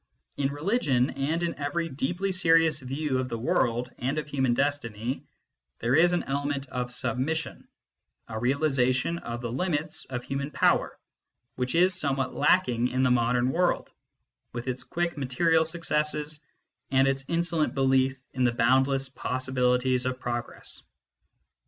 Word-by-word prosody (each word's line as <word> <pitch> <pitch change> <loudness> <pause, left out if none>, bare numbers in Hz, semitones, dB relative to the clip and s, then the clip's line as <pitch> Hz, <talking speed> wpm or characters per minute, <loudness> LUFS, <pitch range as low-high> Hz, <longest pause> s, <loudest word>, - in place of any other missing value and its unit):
In 140 -1 0
religion, 145 - +1
and 150 +5 -1
in 170 -2 -2
every 145 +4 -1
deeply 175 +7 -2
serious 165 -4 +4
view 135 +1 -2
of 130 0 -2
the 115 - -3
world 120 +1 0
and 135 +4 -1
of 150 - -2
human 130 -4 +1
destiny, 130 -4 -2 0.5
there 120 +2 0
is 175 +3 +5
an 175 - +1
element 140 0 -2
of 125 -1 -3
submission, 145 +6 -2 0.6
a 110 - -5
realisation 135 +3 +1
of 120 -3 -6
the 120 -1 -4
limits 155 +2 -2
of 125 -2 -5
human 140 +1 -3
power, - - +2 0.6
which 125 +3 -2
is 180 +2 +4
somewhat 135 -6 -1
lacking 125 -6 +3
in 130 +1 0
the 130 - +3
modern 125 +1 +2
world, 180 +3 0 0.6
with 120 +1 -5
its 130 0 -3
quick 170 0 -2
material 160 +5 +2
successes 150 -2 -1 0.5
and 135 0 +4
its 135 0 0
insolent 170 -2 0
belief 135 0 +2 0.2
in 130 - 0
the 120 - +4
boundless 135 +3 +2
possibilities 130 -1 0
of 130 0 -3
progress. 120 -1 -5
135 Hz, 145 wpm, -27 LUFS, 125-155 Hz, 0.6 s, is